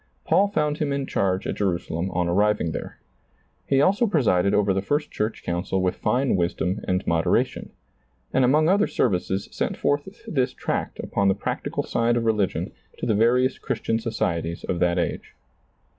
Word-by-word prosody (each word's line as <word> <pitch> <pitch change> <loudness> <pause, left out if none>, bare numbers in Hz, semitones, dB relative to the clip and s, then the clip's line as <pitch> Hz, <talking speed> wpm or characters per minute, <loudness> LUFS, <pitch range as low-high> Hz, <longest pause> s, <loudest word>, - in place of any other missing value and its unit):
Paul 200 - +4
found 150 -6 -1
him 150 -2 0
in 140 -1 -1
chaise 95 -5 0
at - - -3
Jerusalem 90 -2 -1
on 90 -1 -1
arriving 100 -1 +2
there. - - -6 0.7
He 135 0 +3
also 200 +9 +3
presided 100 - +2
over 100 -1 +2
the 95 - 0
first 145 +9 -1
church 110 +1 -3
council 90 +2 -1
with 95 -1 +1
fine 130 -1 +1
wisdom 90 +2 -1
and 90 0 0
moderation, 85 -1 +1 0.6
and 130 - +3
among 150 +5 +4
other 200 +4 +3
services 95 -3 0
sent - - -2
forth 145 +10 -2
this 130 - 0
tract - - -3
upon 100 - 0
the 95 - +3
practical 100 - -3
side 120 0 +1
of 115 - -1
religion 105 -4 0 0.3
to - - -4
the - - +2
various 125 +5 +2
Chris - - -3
tian 115 0 0
societies 85 -7 -2
of 90 - -2
that 90 0 +2
age. 85 - -3
105 Hz, 175 wpm, -24 LUFS, 90-135 Hz, 0.7 s, Paul